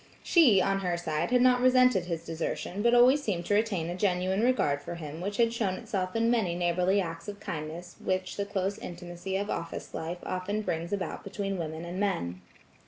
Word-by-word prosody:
She, 270 - +6
on 195 0 +1
her 180 -3 -1
side, 160 0 -1
had 250 0 +4
not 250 -1 +5
resented 255 -7 +5
his 170 -2 -4
dessertion 165 +4 -3
but 235 +2 +4
always 255 +4 +6
seemed 180 -9 -2
to 205 - 0
retain 205 -6 +1
a 175 - -3
genuine 185 0 +1
regard 225 - +2
for 170 - -6
him 160 -1 -7
which 200 +2 -3
had 230 -1 +3
shown 210 -5 0
itself 185 0 -3
in 230 +1 +3
many 205 -8 +1
neighborly 180 +3 +2
acts 165 -2 -4
of 205 0 -6
kindness 170 0 -6
which 185 0 -1
the 200 - -2
close 195 -1 -2
intimacy 175 +2 -5
of 205 +1 -2
office 170 0 -5
life 165 +2 -4
often 200 +4 -2
brings 170 -1 -3
about 200 -2 -3
between 195 -1 -3
women 160 0 -4
and 175 +2 -5
men. 90 - -1
185 Hz, 200 wpm, -29 LUFS, 170-205 Hz, -, She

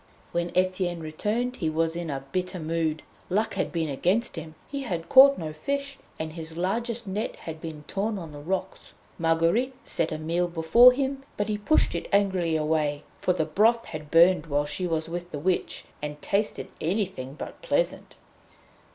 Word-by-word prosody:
When 175 0 -1
Etienne 185 -1 +1
returned 215 +11 -2
he 160 - 0
was 165 +1 0
in 170 -1 -4
a 135 -1 -4
bitter 185 0 -2
mood. 160 -1 -1 0.3
Luck 215 +4 +1
had 190 - -1
been 165 -2 -1
against 180 - 0
him; 160 -1 -7
he 280 0 -4
had 170 -10 -4
caught 275 +1 +9
no 155 -3 -5
fish, 280 - -3 0.2
and 160 0 -4
his 160 0 -7
largest 230 +6 -1
net 205 +3 -3
had 160 -1 -8
been 155 -2 -7
torn 210 +2 -1
on 165 -4 -7
the 145 - -9
rocks. 185 +5 -4 0.3
Marguerite 165 +11 +2
set 165 - -1
a 155 - -2
meal 170 +3 0
before 175 +9 +7
him, 270 +1 -2 0.2
but 205 +1 -1
he 210 - 0
pushed 260 +9 +3
it 170 - -4
angrily 190 -5 +2
away; 150 -2 0 0.2
for - - +1
the 160 -3 0
broth 220 +9 +3
had 155 -2 -7
burned 165 0 +5
while 145 -1 +1
she 165 +5 -2
was 160 -2 -1
with 175 +1 -5
the 150 - -5
Witch, 180 +5 -1 0.2
and 150 0 -5
tasted 200 +7 -1
anything 170 -7 -2
but - - -8
pleasant. - - -1
175 Hz, 180 wpm, -27 LUFS, 160-210 Hz, 0.3 s, caught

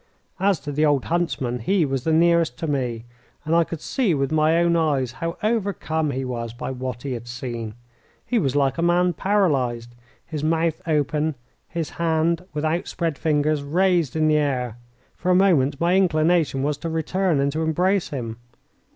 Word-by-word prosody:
As 195 -3 +2
to 145 - -5
the 150 +2 0
old 145 -3 +2
huntsman, 135 -8 -1
he 175 - +2
was 135 -2 -2
the 160 - +2
nearest 165 -4 +3
to - - -4
me, 125 -6 -2 0.4
and 155 - 0
I 170 0 +5
could 165 -1 -7
see 225 - 0
with 135 0 -1
my 155 +1 +3
own 170 0 +3
eyes 145 -7 +1
how 165 +8 -4
overcome 195 -8 0
he 135 -1 -2
was 115 -2 -4
by 120 - -5
what 130 -2 -5
he 140 - -4
had 120 -1 -7
seen. 120 -3 -5 0.5
He 245 - +1
was 140 -6 0
like 140 +2 +1
a - - +1
man 175 +1 +3
paralysed, 135 - 0 0.3
his 155 -3 -5
mouth 160 +1 +1
open, 150 0 0 0.3
his 165 -3 -4
hand, 165 +1 0
with 150 +1 -3
outspread 165 -1 -2
fingers, 150 -1 +1
raised 170 0 +1
in 155 -1 +2
the 155 0 +4
air. 125 -6 -1 0.4
For 180 - -3
a 180 - +5
moment 150 -8 +3
my 175 +2 +2
inclination 165 -5 +2
was 145 0 -1
to 165 - -4
return 165 +1 0
and 140 +1 +1
to 155 +3 -2
embrace 180 +4 +1
him. 115 -5 -5
155 Hz, 185 wpm, -23 LUFS, 135-170 Hz, 0.5 s, I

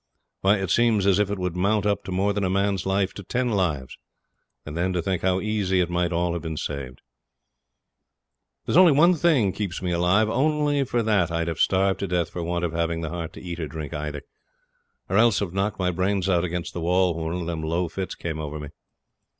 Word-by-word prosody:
Why, 100 +2 +3
it 95 -3 -2
seems 115 -4 +3
as 100 0 +4
if 105 -1 +2
it 100 - -2
would 90 -2 -3
mount 100 +3 +1
up 100 -2 0
to - - -6
more 95 +3 +1
than 100 0 -1
a 95 - +1
man's 100 -1 0
life 95 0 +1
to 100 - -8
ten 125 +6 -1
lives 85 - -1 0.7
and 75 - -7
then 90 +2 0
to 90 - 0
think 95 0 -1
how 95 0 +1
easy 100 -3 0
it 90 -1 0
might 85 0 0
all 85 0 0
have 85 - -3
been 80 -2 -5
saved. 65 -4 -5 1.6
There's - - +1
only 180 -4 +7
one 170 +6 +5
thing 150 - +3
keeps 100 -4 -3
me 90 -1 -2
alive; 90 +5 +3
only 145 +3 +1
for 120 -1 0
that 105 -6 +2
I'd 85 0 -1
have 85 - -3
starved 95 0 +2
to 100 - -2
death 90 -2 -1
for 90 - -5
want 85 +1 -1
of 85 - -2
having 85 0 -1
the 80 - -3
heart 85 -2 -5
to - - -10
eat 85 -2 -6
or 80 - -3
drink 75 0 -7
either, 75 -1 -4 0.8
or - - 0
else 115 -3 +5
have 95 -4 -2
knocked 100 +1 -1
my 90 -1 0
brains 95 +1 0
out 90 -3 +2
against 90 -1 -3
the 85 - -4
wall 90 +1 +2
when 80 0 -5
one 90 - -3
of - - -4
them 85 -1 -3
low 85 +3 -1
fits 95 +3 -5
came 80 -2 -5
over 75 0 -5
me. 75 -1 -7
90 Hz, 230 wpm, -24 LUFS, 85-100 Hz, 1.6 s, only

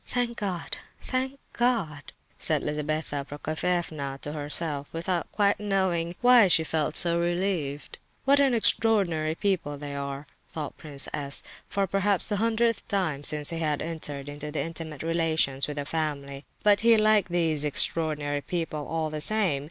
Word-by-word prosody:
"Thank 240 -1 -1
God—thank 255 +7 -4 0.2
God!" 205 - -1 0.3
said - - +2
Lizabetha 150 -1 -2
Prokofievna 155 -1 -3
to 145 - -4
herself, 145 -1 -1
without 170 +1 -2
quite 200 -1 +2
knowing 190 -4 0
why 245 -4 +7
she 165 -2 +4
felt 155 -1 -1
so 170 -1 +5
relieved. 170 -5 -2 0.3
"What 280 +1 +5
extraordinary 215 - +2
people 170 -7 -1
they 145 0 -7
are!" 140 0 -5 0.2
thought 150 -3 -6
Prince 145 -4 -4
S., 140 -2 -2 0.3
for 200 -1 0
perhaps 195 +1 +1
the 205 - -1
hundredth 230 +1 +1
time 165 -8 -1
since 150 +1 +5
he 165 - -3
had 150 -3 -1
entered 150 -4 -3
into 145 +1 -6
intimate 160 -3 -5
relations 160 -5 +1
with 150 0 -6
the 145 - -3
family; 140 -3 -4 0.2
but—he 215 +2 +5
liked 215 -2 +3
these 160 -4 +1
"extraordinary 150 -1 +2
people," 160 -3 -4
all 160 -1 -2
the 155 0 -4
same. 195 -6 +2
165 Hz, 145 wpm, -27 LUFS, 145-195 Hz, 0.3 s, why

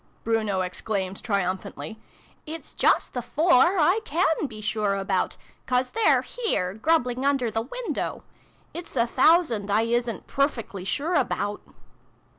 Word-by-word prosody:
Bruno 215 -4 0
exclaimed 190 +1 -3
triumphantly. 200 +2 -3 0.2
" - - -31
It's - - -15
just - - +2
the 245 - -2
four 330 - +3
I 350 +6 +4
can 320 -3 +1
be 220 -4 -9
sure 210 -1 0
about; 195 -1 -1 0.3
'cause 250 0 +1
they're 450 0 +3
here, 420 - -1
grub 310 +8 +2
bling 250 +1 -4
under 275 -5 +1
the 225 - -1
window! 475 - -4 0.5
It's 345 +1 -7
the 235 -3 +1
thousand 255 - +3
I 210 +2 +3
isn't 235 0 -1
pruffickly 235 -9 -2
sure 310 - -1
about 205 - 0
235 Hz, 140 wpm, -25 LUFS, 205-300 Hz, 0.5 s, I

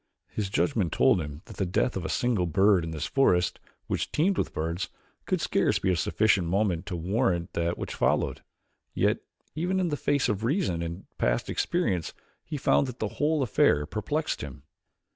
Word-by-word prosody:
His 105 -3 -3
judgment 105 - +1
told 90 - +4
him 75 +2 -7
that - - -12
the 95 - 0
death 110 +7 +1
of 95 - -3
a - - -3
single 115 -8 +1
bird 95 +2 +4
in 80 - -4
this 80 -2 -3
forest 90 -10 +2 0.3
which - - -2
teemed 185 +6 +2
with - - -1
birds 85 +3 -2 0.4
could - - +1
scarce - - +2
be 95 - +1
of 90 - +1
sufficient 105 -5 +2
moment 95 -1 0
to 90 - -3
warrant 85 -1 0
that 85 0 -1
which - - -5
followed. - - +1 0.5
Yet - - +2 0.3
even 180 +4 0
in 180 -2 +1
the 150 - 0
face 145 -1 +1
of 105 -2 -1
reason 115 - 0
and 85 +3 -5
past - - +1
experience 100 - -1 0.3
he 150 - -5
found 140 0 +3
that 125 -1 -7
the 110 - -2
whole 150 +3 +1
affair 75 - +3
perplexed 145 - -2
him. 70 -1 -8
95 Hz, 185 wpm, -27 LUFS, 85-135 Hz, 0.5 s, told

